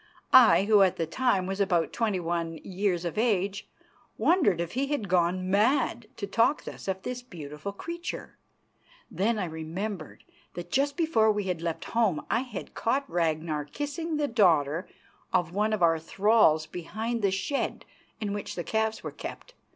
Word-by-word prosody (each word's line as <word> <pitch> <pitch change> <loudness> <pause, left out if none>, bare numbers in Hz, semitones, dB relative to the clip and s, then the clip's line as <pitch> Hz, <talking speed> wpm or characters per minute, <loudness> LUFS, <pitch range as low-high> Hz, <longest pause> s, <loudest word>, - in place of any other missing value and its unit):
I, 235 -6 +8
who 210 0 +5
at 190 -2 +4
the 165 - -1
time 195 +1 +1
was 195 +2 -2
about 175 -6 +1
twenty 215 -5 0
one 165 -1 -2
years 185 -2 -1
of 170 +5 -2
age, 200 -3 0 0.5
wondered 315 - +3
if 170 -1 -2
he 270 +3 -1
had 275 -8 -2
gone 180 +1 +1
mad 235 +2 +2
to 205 - -3
talk 230 +8 +2
thus - - -9
of 190 0 -2
this 250 0 -4
beautiful 160 - -7
creature. 340 +11 -6 0.8
Then 220 +4 +1
I 200 - -1
remembered 165 +3 -5 0.3
that 175 0 -7
just 280 +3 +1
before 315 -11 +3
we 210 -1 -1
had 180 -3 -3
left 170 -1 -3
home 220 -9 +1
I 230 - +3
had 245 -6 -6
caught 270 +4 0
Ragnar 160 - -1
kissing 290 - -4
the 295 -1 +1
daughter 170 - +2 0.4
of 175 -1 +1
one 210 +2 +1
of 215 -5 0
our 165 -1 +4
thralls 195 -3 +3
behind 220 +8 -4
the 200 - +3
shed 195 +9 -2 0.3
in 205 -2 -2
which 205 - -5
the 175 - -3
calves 220 +2 -1
were - - -4
kept. - - -8
200 Hz, 170 wpm, -28 LUFS, 170-230 Hz, 0.8 s, I